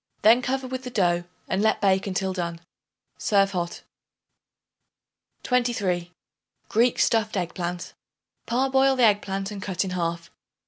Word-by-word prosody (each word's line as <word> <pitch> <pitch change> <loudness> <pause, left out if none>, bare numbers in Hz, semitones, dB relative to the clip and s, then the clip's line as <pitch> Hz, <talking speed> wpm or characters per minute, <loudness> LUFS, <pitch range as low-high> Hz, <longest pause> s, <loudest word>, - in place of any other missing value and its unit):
Then 230 +4 +6
cover 265 +1 -2
with 255 0 -4
the 250 - -5
dough 175 -6 +1 0.2
and 190 - 0
let 220 0 +2
bake 195 -1 +2
until 190 0 -1
done. 170 -2 -3 0.6
Serve 195 -1 +3
hot. 175 -2 -4 1.6
23. 205 -9 0 0.6
Greek 235 +2 +3
Stuffed 220 -2 +2
Egg 175 -2 -2
Plant. 180 0 -4 0.5
Parboil 265 +2 +3
the 255 - +2
egg 210 -2 +5
plant 195 +1 -4
and 200 -2 -6
cut 190 -1 -1
in 185 - -4
half. 170 -1 -3
195 Hz, 140 wpm, -25 LUFS, 180-240 Hz, 1.6 s, Then